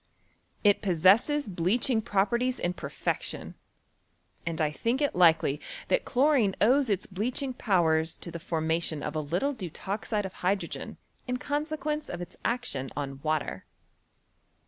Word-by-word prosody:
It 205 -2 +5
possesses 205 - +4
bleaching 215 +6 +1
properties 235 +4 +1
in 175 - -1
perfection, 140 -5 -3 0.9
and 165 -1 -2
I 155 -2 +2
diink 230 - 0
it 290 -1 +1
likely 165 -5 +4 0.3
that - - +2
chlorine 260 -7 +3
owes 255 +4 +4
its 200 -2 0
bleaching 250 +7 -2
powers 165 -8 +2
to 170 - -8
the 170 - -6
formation 160 -2 -1
of 150 - -4
a - - +1
little 175 - 0
deutoxide 205 - -3
of 190 - -6
hy 185 +2 +3
drogen 200 - -7 0.3
in 250 0 0
consequence 300 +2 -2
of 175 - -5
its 175 0 -8
action 235 - -1
on 135 -2 -4
water. 155 -1 -1
195 Hz, 140 wpm, -28 LUFS, 165-250 Hz, 0.9 s, It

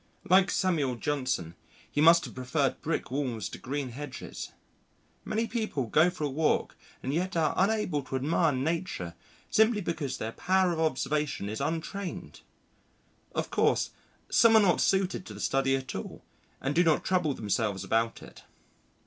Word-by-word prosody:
Like 190 +1 +5
Samuel 155 -9 +1
Johnson, 130 - -2 0.4
he 145 - 0
must 170 +2 +7
have - - -9
preferred 130 +2 -1
brick 155 -4 -2
walls 125 -6 -2
to - - -9
green 140 0 -3
hedges. 135 +1 -7 0.7
Many 220 +2 -1
people 220 - -2
go 155 +9 +4
for 180 -3 -6
a - - +2
walk 150 +3 0 0.3
and 130 - -2
yet 180 +3 -1
are 160 -2 +2
unable 195 -6 +1
to 135 - -5
admire 155 +4 +2
Nature 140 - -2 0.4
simply 220 0 +4
because 155 -8 -3
their 110 - -4
power 185 +6 +2
of 160 - -4
observation 150 -6 -1
is 110 +5 -4
untrained. 165 +6 -4 0.9
Of - - -2
course - - +2 0.4
some 230 -1 +5
are - - +9
not 195 -4 +3
suited 190 -1 +1
to - - -8
the - - -9
study 135 0 +1
at 135 -1 -4
all - - -7 0.4
and 135 +2 -1
do 175 +4 +4
not 160 -3 +3
trouble 180 -7 +1
themselves 105 -2 -1
about 115 0 0
it. - - -13
150 Hz, 160 wpm, -29 LUFS, 130-180 Hz, 0.9 s, are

